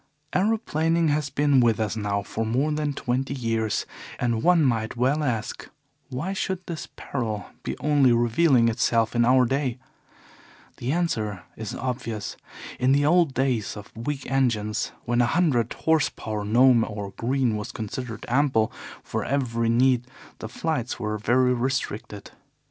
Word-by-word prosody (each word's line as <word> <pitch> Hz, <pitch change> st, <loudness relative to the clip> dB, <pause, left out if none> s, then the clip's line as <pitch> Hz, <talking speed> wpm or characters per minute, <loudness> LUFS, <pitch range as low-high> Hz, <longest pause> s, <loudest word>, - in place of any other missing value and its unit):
"Aeroplaning 170 Hz, -6 st, +1 dB
has 145 Hz, -1 st, 0 dB
been 145 Hz, 0 st, +3 dB
with 115 Hz, -2 st, +3 dB
us 110 Hz, -1 st, -1 dB
now 100 Hz, -2 st, -1 dB
for 110 Hz, +3 st, -3 dB
more 130 Hz, +7 st, 0 dB
than 150 Hz, -1 st, -1 dB
twenty 130 Hz, +1 st, -2 dB
years, 115 Hz, -4 st, -1 dB, 0.3 s
and 120 Hz, -2 st, 0 dB
one 175 Hz, +1 st, +4 dB
might 110 Hz, -3 st, 0 dB
well 135 Hz, +5 st, +2 dB
ask: 115 Hz, -6 st, -3 dB, 0.4 s
Why 145 Hz, +9 st, -3 dB
should 190 Hz, -1 st, -3 dB
this 170 Hz, -2 st, -6 dB
peril 110 Hz, -6 st, -4 dB
be -, -, -4 dB
only 145 Hz, -4 st, +3 dB
revealing 120 Hz, +2 st, +4 dB
itself 115 Hz, 0 st, +1 dB
in 120 Hz, -, +4 dB
our 125 Hz, +1 st, +5 dB
day? 135 Hz, -1 st, -1 dB, 1.0 s
The 125 Hz, -, -2 dB
answer 110 Hz, -, -1 dB
is 110 Hz, -2 st, -6 dB
obvious. 115 Hz, -4 st, -4 dB, 0.4 s
In 130 Hz, +2 st, +3 dB
the 145 Hz, +1 st, +3 dB
old 165 Hz, -3 st, +3 dB
days 125 Hz, -6 st, 0 dB
of 105 Hz, 0 st, -11 dB
weak 135 Hz, +4 st, -4 dB
engines, 115 Hz, -6 st, 0 dB
when 120 Hz, +1 st, +2 dB
a 120 Hz, -, +3 dB
hundred 140 Hz, -10 st, +2 dB
horse 160 Hz, -2 st, +2 dB
power 105 Hz, -1 st, -5 dB
Gnome 120 Hz, +2 st, +5 dB
or 105 Hz, -2 st, -5 dB
Green 120 Hz, +2 st, 0 dB
was 105 Hz, +2 st, -5 dB
considered 115 Hz, +2 st, -6 dB
ample 120 Hz, -3 st, +2 dB, 0.3 s
for -, -, -3 dB
every 115 Hz, -4 st, 0 dB
need, 125 Hz, +1 st, +3 dB, 0.3 s
the 110 Hz, -, -6 dB
flights 130 Hz, -2 st, -2 dB
were 105 Hz, 0 st, -2 dB
very 125 Hz, +4 st, +3 dB
restricted. 120 Hz, -5 st, -3 dB
125 Hz, 150 wpm, -25 LUFS, 110-140 Hz, 1.0 s, our